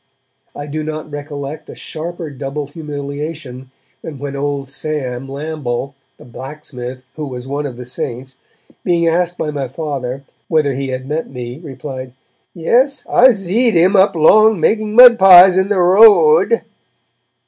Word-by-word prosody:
I 145 - -7
do 155 +1 -5
not 155 0 -6
recollect 145 +1 -7
a - - -10
sharper 165 0 -7
double 140 +1 -5
humiliation 145 -2 -7 0.3
than 155 -3 -8
when 140 +1 -6
old 140 -1 -3
Sam 135 -3 -4
Lamble, 140 -2 -5 0.2
the - - -16
blacksmith, 130 -1 -9
who 150 -2 -5
was 125 -1 -8
one 145 +1 -3
of 125 -3 -9
the 125 - -9
'saints', 130 +1 -7 0.4
being 170 -2 +1
asked 175 +1 0
by 150 - -3
my 140 -3 -4
Father 135 -2 -5 0.2
whether 150 -4 +1
he 135 +1 -4
had 130 0 -5
met 155 +3 -4
me, 125 0 -8
replied 135 -4 -8 0.4
'Yes, 250 - +1
I 255 +1 +5
zeed 215 +4 0
'un 185 +5 +3
up 190 -1 +4
long, 215 +6 +5
making 215 +4 0
mud 245 -1 +8
pies 185 -1 +8
in 190 +1 +1
the 205 -3 0
ro 220 - +6
ad!' 465 - -1
150 Hz, 155 wpm, -16 LUFS, 135-175 Hz, 0.4 s, mud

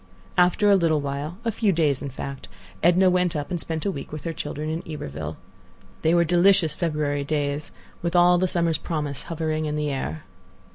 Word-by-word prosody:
After 180 +3 +4
a 200 - +7
little 165 -4 +3
while, 145 +4 -4
a 230 - +2
few 215 -1 +1
days, 155 -6 +1
in 140 - -4
fact, 135 +1 -7 0.3
Edna 180 +3 +5
went 180 -2 +2
up 145 +3 -3
and 175 - -1
spent 160 -1 -4
a 200 - +1
week 140 -6 -7
with 155 -1 -6
her 165 - -3
children 150 -1 -4
in 160 +2 -2
Iberville. 80 - -5 0.6
They 160 +2 +3
were 170 0 +4
delicious 175 -1 +4
February 150 -4 -1
days, 145 0 -2 0.3
with 170 +1 -2
all 175 0 +6
the 185 - +2
summer's 170 -3 +1
promise 150 -5 -3
hovering 155 -1 -1
in 150 - -2
the 150 -1 -1
air. 80 - -4
155 Hz, 195 wpm, -24 LUFS, 145-175 Hz, 0.6 s, a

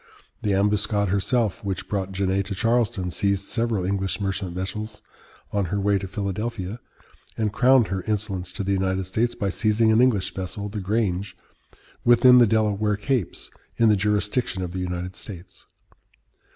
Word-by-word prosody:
The 100 -2 +1
Ambuscade 105 0 +1
herself, 100 +1 0
which 95 -2 -3
brought 95 -2 -2
Genet 95 0 0
to 100 - -4
Charleston, 115 -3 0
seized 100 +1 0
several 115 -5 -1
English 95 +1 -1
merchant 95 -3 -3
vessels 105 +3 -5 0.5
on 100 -2 0
her 100 +4 -2
way 100 0 +2
to 95 - -5
Philadelphia, 100 +2 -4 0.6
and 110 -2 -1
crowned 125 -1 +4
her 95 -1 -2
insolence 100 -4 -2
to 100 - -3
the 100 - -1
United 95 0 0
States 110 +6 -1
by 100 - -1
seizing 110 +3 +2
an 110 +2 +5
English 115 -7 +2
vessel, 100 +2 -4
the 105 +1 -5
Grange, 100 -1 -1 0.7
within 125 +1 +7
the 120 - +6
Delaware 105 -1 +1
capes, 105 -1 -2 0.3
in 115 -1 +5
the 105 - +5
jurisdiction 105 0 0
of 90 - -4
the 95 - -4
United 90 0 -4
States. 90 -2 -10
100 Hz, 160 wpm, -24 LUFS, 95-110 Hz, 0.7 s, within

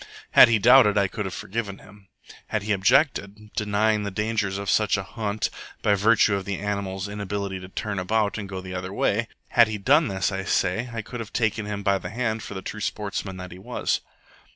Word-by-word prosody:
Had - - +9
he 115 -1 +3
doubted, 115 -1 +6
I 100 -1 +3
could 105 +2 -5
have 95 - -4
forgiven 100 -1 -4
him. 100 -1 -17 0.4
Had 110 -2 -2
he 105 - -2
objected, 105 -1 +1
denying 105 +1 +1
the 100 - -3
dangers 105 -1 -1
of 100 0 -5
such 105 0 +3
a 95 - -3
hunt 110 -1 -3 0.3
by 105 - +4
virtue 105 +1 +4
of 100 -1 -1
the 100 0 -3
animal's 100 -2 -3
inability 100 -1 -4
to 90 0 -10
turn 105 0 -3
about 105 +3 0
and 100 -2 -6
go 95 -1 -5
the 95 0 -8
other 90 +1 -4
way 105 +3 0 0.2
had 115 -2 +5
he 110 -1 -3
done 145 +9 +4
this, 95 +1 -1
I 95 0 -3
say, 100 +5 0
I 115 -1 -4
could 120 +3 -7
have 115 -1 -6
taken 110 -2 0
him 100 -1 -4
by 100 -1 +2
the - - -6
hand 110 -1 -2
for 105 - -8
the 95 - -6
true 110 - -6
sportsman 100 -2 -3
that 90 0 -8
he 90 - -10
was. - - -2
105 Hz, 220 wpm, -25 LUFS, 95-110 Hz, 0.4 s, Had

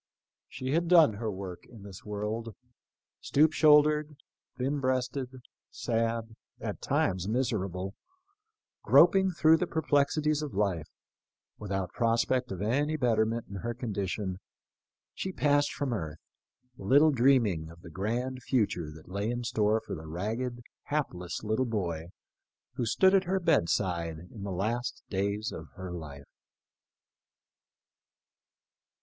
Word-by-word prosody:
She 130 0 -4
had 170 +3 +1
done 165 -9 +6
her 110 +2 -3
work 95 -2 -7
in 115 -5 -13
this 100 -2 -10
world. 105 +1 -4 0.6
Stoop 155 +2 +3
shouldered, 150 -1 +4 0.4
thin 135 +3 -1
breasted, 130 0 -1 0.4
sad, 115 -1 -2
— - - -45
at - - -5
times 95 -1 0
miserable, 100 -6 -1 0.5
— 435 0 -58
groping 190 +2 +6
through 160 -2 +4
the 180 - -1
per 160 -1 -2
plexities 150 +1 +2
of 150 -7 -5
life, 95 -7 0 0.7
without 95 -2 -3
prospect 120 +1 +1
of 95 +1 -4
any 145 +8 +1
betterment 115 -3 +1
in 100 - -7
her 120 +4 -4
condition, 100 -5 -3 0.7
she 190 - -4
passed 145 -4 +2
from 140 -4 -2
earth, 80 -8 -4 0.6
little 140 +10 +5
dreaming 115 - +3
of 85 +1 -14
the 85 - -10
grand 120 +8 -2
future 105 - 0
that 80 0 -13
lay 100 +4 -2
in 120 0 -2
store 110 -2 +2
for - - -5
the 80 -2 -7
ragged, 115 +9 -3 0.2
hapless 90 - -3
little 110 +4 +1
boy 85 -7 -2 0.7
who 125 -2 -2
stood 190 - +4
at 190 -1 +4
her 190 +2 +1
bed 165 - +2
side 85 -4 -1 0.2
in 105 - -9
the 100 0 -4
last 115 +7 -2
days 100 +3 -1
of 80 -1 -8
her 95 -1 -7
life. 75 -5 -8
115 Hz, 135 wpm, -29 LUFS, 95-140 Hz, 0.7 s, done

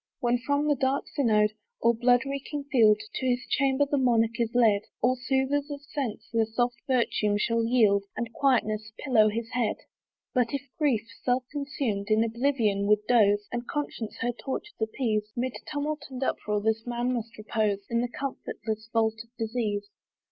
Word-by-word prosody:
When 240 -2 +1
from 285 +4 0
the 295 - +4
dark 270 0 0
synod, 215 -6 +3 0.3
or 235 - +4
blood 245 +2 +3
reeking 280 +1 -4
field, 215 -5 +5
To 260 - -2
his 250 +1 0
chamber 275 0 +2
the 285 0 0
monarch 230 -2 +2
is 230 -2 +1
led, 220 -4 +5 0.2
All 250 +2 +3
soothers 265 +3 0
of 290 -1 -5
sense 270 -7 -4
their 225 -1 +2
soft 240 +2 0
virtue 230 -5 +2
shall 230 +2 +1
yield, 215 -4 +3
And 235 -1 -3
quietness 215 -6 +1
pillow 225 -6 +4
his 230 +2 -4
head. 240 -3 0 0.6
But 250 0 +1
if 280 - -3 0.2
grief, 240 -8 +1
self 250 0 +1
consumed, 270 -8 -2
in 215 +1 +4
oblivion 230 -4 +1
would 210 0 +3
doze, 205 -3 +4
And 240 0 -4
conscience 285 -7 -4
her 240 +1 +1
tortures 270 - -5
appease, 220 -2 -1
'Mid 250 +1 -1 0.2
tumult 300 0 -2
and 260 0 -4
uproar 210 -5 -1
this 220 +1 0
man 240 +1 -1
must 230 -2 -4
repose; 210 -2 -1
In 235 0 0
the 245 - 0
comfortless 220 -4 -5
vault 220 -1 +1
of 230 - -27
disease. 220 -3 -2
235 Hz, 170 wpm, -27 LUFS, 220-265 Hz, 0.6 s, field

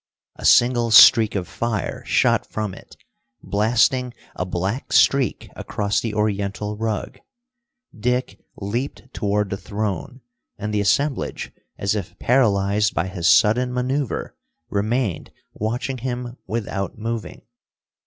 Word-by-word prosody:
A - - -8
single 120 -1 +5
streak 110 0 +8
of 95 -3 -2
fire 115 -3 -3
shot - - +2
from 105 -3 -4
it, - - -14 0.5
blasting 120 +4 +1 0.2
a 90 - -2
black 95 +8 -3
streak 135 -5 +3
across 100 -1 -1
the 110 -3 -4
Oriental 105 0 -1
rug. 110 -1 -3 0.8
Dick 125 +3 -1 0.2
leaped 120 +5 -5
toward 105 -1 -1
the 100 - -2
throne, 105 +5 -4 0.4
and 105 +1 -4
the 105 - +1
assemblage, 135 +8 0 0.3
as 100 0 0
if 100 -5 -5
paralyzed 105 -5 +2
by 85 - 0
his 90 -3 -2
sudden 125 +6 +4
maneuver, 130 +1 -2 0.4
remained 110 -1 -1 0.2
watching 120 +4 -3
him 125 0 -4
without 100 -3 -3
moving. 115 0 -5
110 Hz, 120 wpm, -22 LUFS, 100-125 Hz, 0.8 s, streak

